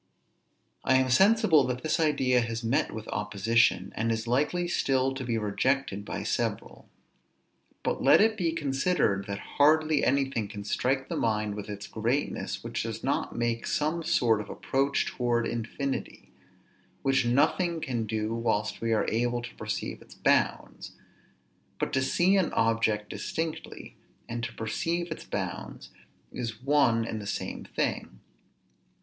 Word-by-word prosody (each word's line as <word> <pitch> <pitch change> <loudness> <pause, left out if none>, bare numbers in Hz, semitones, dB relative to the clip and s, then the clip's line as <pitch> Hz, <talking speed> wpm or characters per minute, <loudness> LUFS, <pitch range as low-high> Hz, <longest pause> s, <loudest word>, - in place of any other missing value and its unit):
I 130 - +3
am 130 -1 +3
sensible 185 - +5
that 125 0 -3
this 155 +1 0
idea 135 -6 +3
has 115 0 -3
met 115 +5 +1
with 110 0 -7
opposition, 105 +3 +1
and 115 +1 0
is 110 0 -2
likely 150 +9 +1
still 135 -5 +1
to 135 0 -5
be 115 -2 -1
rejected 105 0 0
by - - -5
several. - - -3 0.9
But - - -1
let - - +6
it 220 +1 +4
be 175 -6 0
considered 135 - 0
that 100 0 -3 0.2
hardly 155 0 +4
anything 135 -5 +1
can 105 0 -7
strike 135 +6 0
the - - -3
mind 105 -2 0
with 105 0 -7
its 105 0 -6
greatness, 120 +6 -2
which - - -3
does - - -5
not - - -1
make 115 0 -1
some 155 +3 0
sort 115 -8 +2
of 105 - -10
approach 140 +1 0
towards 120 -2 0
infinity; 120 +4 -4 0.7
which 135 -1 +3
nothing 165 +8 +2
can 120 -7 -2
do 110 +1 -2
whilst 110 -2 -1
we 115 0 +1
are 110 - +2
able 120 +1 0
to 120 - -8
perceive - - -4
its - - -15
bounds; - - 0 0.9
but - - -2
to 135 - +2
see 175 +8 +3
an 185 -4 +1
object 115 -2 +1
distinctly, 160 -1 -5 0.3
and 115 0 -4
to 115 - -6
perceive 165 +10 -2
its 155 - -6
bounds, - - -5 0.4
is 115 -3 -5
one 130 -5 +3
and 110 -1 -4
the 100 - -7
same 105 - -4
thing. - - -3
120 Hz, 150 wpm, -28 LUFS, 110-145 Hz, 0.9 s, let